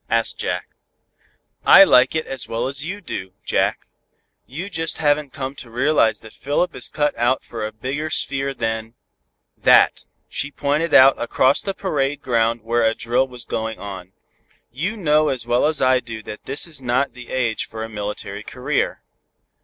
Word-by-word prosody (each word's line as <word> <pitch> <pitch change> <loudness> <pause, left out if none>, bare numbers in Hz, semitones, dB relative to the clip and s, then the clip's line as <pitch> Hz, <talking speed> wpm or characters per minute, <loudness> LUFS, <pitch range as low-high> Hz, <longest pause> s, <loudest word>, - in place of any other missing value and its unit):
asked - - 0
Jack. - - -3 0.9
"I - - +9
like 125 - +5
it 160 - 0
as 135 -2 -3
well 115 +2 -2
as 140 +2 -5
you 195 +6 -5
do, 95 - -6
Jack. - - 0 0.6
You 165 +9 -6
just 165 -5 -2
haven't 145 -2 +1
come 135 0 -5
to 120 - -9
realize 120 -3 +2
that 110 - -13
Philip 150 +6 -1
is - - -4
cut 150 -1 0
out 120 +3 +1
for 115 -2 -6
a 110 - -3
bigger 135 +8 -4
sphere 140 -2 -1
than 110 0 -3 0.6
that." - - +4 0.2
She 145 - -2
pointed 150 +3 0
out 135 +1 +7
across 130 +3 +3
the 195 -1 -3
parade 145 -7 -1
ground 115 -2 +1
where 120 +1 +1
a 110 0 +2
drill 120 +3 +1
was 125 -2 -11
going 110 0 -3
on. 95 -2 -8 0.6
"You 170 - -3
know 155 -5 +3
as 125 -3 -2
well 120 +4 +2
as 155 -1 +1
I 130 0 +4
do 115 -3 -8
that 105 - -9
this 135 +2 +1
is 155 -5 -6
not 130 +2 0
the 125 -1 -11
age 120 -4 -1
for 110 0 -6
a - - -4
military 105 -1 -5
career." - - -2
130 Hz, 175 wpm, -21 LUFS, 115-150 Hz, 0.9 s, I